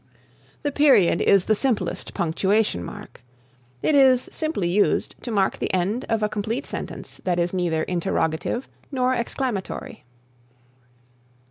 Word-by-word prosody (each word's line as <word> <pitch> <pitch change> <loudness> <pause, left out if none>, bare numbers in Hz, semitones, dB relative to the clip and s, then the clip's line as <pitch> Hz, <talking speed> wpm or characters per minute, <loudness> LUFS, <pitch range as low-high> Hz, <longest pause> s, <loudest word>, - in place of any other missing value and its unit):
The 290 - 0
Period 265 - +4
is 195 -2 +4
the 220 - +3
simplest 215 -6 -1
punctuation 190 - +1
mark. - - -10 0.6
It - - +2
is 260 -3 +5
simply 310 - -1
used 195 +4 +1
to - - -6
mark 200 -4 +1
the - - -1
end 195 +8 0
of 225 -2 +1
a - - +3
complete 220 +6 -3
sentence - - -7
that 180 -2 0
is 175 +1 0
neither 170 -4 0
interrogative 170 +6 -1 0.2
nor 255 -1 +1
exclamatory. 235 -4 -3
210 Hz, 130 wpm, -23 LUFS, 180-255 Hz, 0.6 s, is